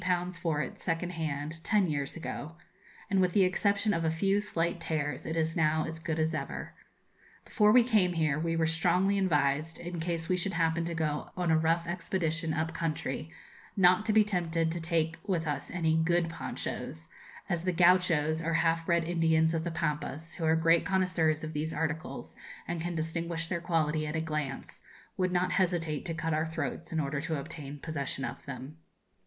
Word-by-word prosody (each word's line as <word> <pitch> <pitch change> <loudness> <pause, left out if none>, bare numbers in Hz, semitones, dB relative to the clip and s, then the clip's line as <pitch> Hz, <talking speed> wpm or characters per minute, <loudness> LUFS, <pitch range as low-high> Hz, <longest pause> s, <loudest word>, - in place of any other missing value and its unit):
for 155 -3 0
it, - - -8
second 175 +1 -1
hand, 155 -1 -4
ten 205 -2 +3
years 145 -3 -2
ago; 160 -2 -5 0.6
and, 195 -1 +4
with 180 -1 +2
the 200 - +5
exception 200 +3 +2
of 165 - 0
a 160 - +2
few 195 +5 +2
slight 170 -4 -1
tears, 150 -3 -2
it 160 +1 -2
is 160 0 0
now 155 0 +2
as 160 0 -5
good 160 -1 -3
as 160 0 +1
ever. - - -4 0.7
Before 210 -2 +4
we 245 +1 +7
came 210 -7 +3
here, 155 -3 +1
we 165 +1 0
were 165 -1 +2
strongly 180 +4 +2
advised, 155 -3 +1
in 175 0 -5
case 165 0 -2
we 185 - +2
should 190 +2 -2
happen 165 0 +1
to 170 0 -3
go 155 -2 -1
on 175 -2 +1
a - - +5
rough 165 +1 +2
expedition 165 -1 -1
up 160 +1 -1
country, 155 -2 -3 0.5
not 185 +1 +5
to - - +3
be 215 0 +6
tempted 170 -5 0
to 170 0 -3
take 165 -1 0
with 175 -5 0
us 145 -2 -3
any 160 -3 +1
good 165 +1 +2
ponchos, 80 - -5 0.4
as 170 -1 -1
the 185 - +1
Gauchos, 170 -3 +4
or 165 0 0
half 165 0 +1
bred 170 -1 +3
Indians 160 -1 +2
of 160 -1 -1
the 170 - -2
Pampas, 160 0 -3
who 165 - -2
are 160 0 +4
great 165 +1 +4
connoisseurs 180 -5 +1
of 155 0 -5
these 155 +2 -2
articles, 160 0 -3 0.3
and 170 -1 -3
can 175 +1 -3
distinguish 165 +1 -2
their 170 0 -3
quality 155 -2 0
at 150 - -3
a - - +1
glance, 150 -4 -4 0.3
would 185 -1 0
not 180 0 +1
hesitate 165 -4 0
to 165 -3 -3
cut 165 0 -1
our 155 +1 +1
throats 160 0 -4
in 160 - 0
order 140 -1 -1
to 160 -1 -2
obtain 145 -1 -7
possession 140 -3 -3
of - - -6
them. 135 +3 -7
165 Hz, 195 wpm, -30 LUFS, 155-175 Hz, 0.7 s, we